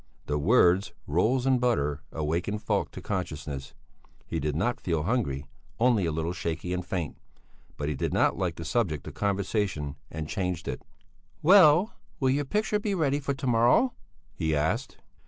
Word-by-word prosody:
The 75 Hz, 0 st, -1 dB
words 95 Hz, +1 st, +4 dB
"rolls 110 Hz, -, +1 dB
and 130 Hz, -2 st, +3 dB
butter" 75 Hz, -13 st, +1 dB
awakened 85 Hz, +7 st, -2 dB
Falk -, -, 0 dB
to -, -, -8 dB
consciousness; 75 Hz, -8 st, -4 dB, 0.5 s
he 80 Hz, -, -3 dB
did 75 Hz, 0 st, -1 dB
not 120 Hz, +10 st, 0 dB
feel 80 Hz, -4 st, 0 dB
hungry, 80 Hz, -, -1 dB, 0.3 s
only 115 Hz, -7 st, +3 dB
a -, -, 0 dB
little 80 Hz, +2 st, -2 dB
shaky 85 Hz, 0 st, -3 dB
and 90 Hz, 0 st, -2 dB
faint. 85 Hz, -3 st, -4 dB, 0.6 s
But 75 Hz, -, -3 dB
he 75 Hz, -, 0 dB
did 65 Hz, -, -2 dB
not -, -, +3 dB
like 90 Hz, -4 st, -1 dB
the 85 Hz, -, -7 dB
subject 85 Hz, -, 0 dB
of -, -, -7 dB
conversation 100 Hz, -7 st, -1 dB
and 80 Hz, 0 st, -5 dB
changed 90 Hz, -1 st, -3 dB
it. -, -, -3 dB, 0.6 s
"Well, 180 Hz, +2 st, +7 dB, 0.3 s
will 130 Hz, -2 st, +3 dB
your 145 Hz, +2 st, 0 dB
picture 210 Hz, +6 st, 0 dB
be 210 Hz, -1 st, -1 dB
ready 145 Hz, -5 st, +1 dB
for 140 Hz, -1 st, -2 dB
to 135 Hz, -, -6 dB
morrow?" 120 Hz, -, +4 dB, 0.4 s
he 80 Hz, -2 st, 0 dB
asked. 75 Hz, +2 st, -1 dB
90 Hz, 170 wpm, -28 LUFS, 80-125 Hz, 0.6 s, Well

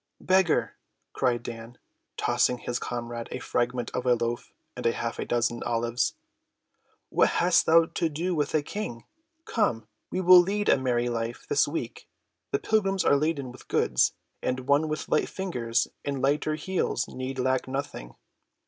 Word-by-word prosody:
"Beggar!" 185 Hz, -2 st, +2 dB, 0.4 s
cried 120 Hz, -3 st, 0 dB
Dan, 115 Hz, 0 st, -8 dB, 0.4 s
tossing 125 Hz, -, +2 dB
his 120 Hz, 0 st, -3 dB
comrade 120 Hz, -1 st, -5 dB
a -, -, -4 dB
fragment 120 Hz, 0 st, -1 dB
of 125 Hz, -, -3 dB
a 125 Hz, -, +5 dB
loaf 120 Hz, 0 st, -3 dB, 0.2 s
and -, -, -6 dB
half 115 Hz, 0 st, -1 dB
a -, -, -2 dB
dozen 120 Hz, 0 st, 0 dB
olives, 120 Hz, 0 st, 0 dB, 0.9 s
"what -, -, +3 dB
hast 175 Hz, 0 st, +3 dB
thou 165 Hz, +1 st, +6 dB
to 165 Hz, 0 st, -1 dB
do 170 Hz, +5 st, -2 dB
with 150 Hz, -2 st, 0 dB
a 150 Hz, -, +2 dB
King? 135 Hz, -, -5 dB, 0.4 s
Come, 115 Hz, -, 0 dB, 0.2 s
we 185 Hz, -, -2 dB
will 185 Hz, 0 st, +9 dB
lead 205 Hz, +3 st, -1 dB
a -, -, +6 dB
merry 120 Hz, -2 st, +1 dB
life 115 Hz, 0 st, -3 dB
this -, -, +3 dB
week; -, -, -5 dB, 0.4 s
the -, -, +1 dB
pilgrims 195 Hz, -4 st, +1 dB
are -, -, +5 dB
laden 140 Hz, -3 st, -1 dB
with 125 Hz, -, -15 dB
goods, 60 Hz, -, +2 dB, 0.3 s
and 130 Hz, 0 st, -1 dB
one 140 Hz, +4 st, +2 dB
with 155 Hz, 0 st, -3 dB
light -, -, +1 dB
fingers 120 Hz, -12 st, -1 dB, 0.2 s
and 140 Hz, -1 st, -2 dB
lighter 145 Hz, +3 st, +1 dB
heels 185 Hz, +4 st, -1 dB
need 130 Hz, +1 st, -5 dB
lack 130 Hz, 0 st, 0 dB
nothing." 135 Hz, -, -5 dB
130 Hz, 160 wpm, -27 LUFS, 120-165 Hz, 0.9 s, will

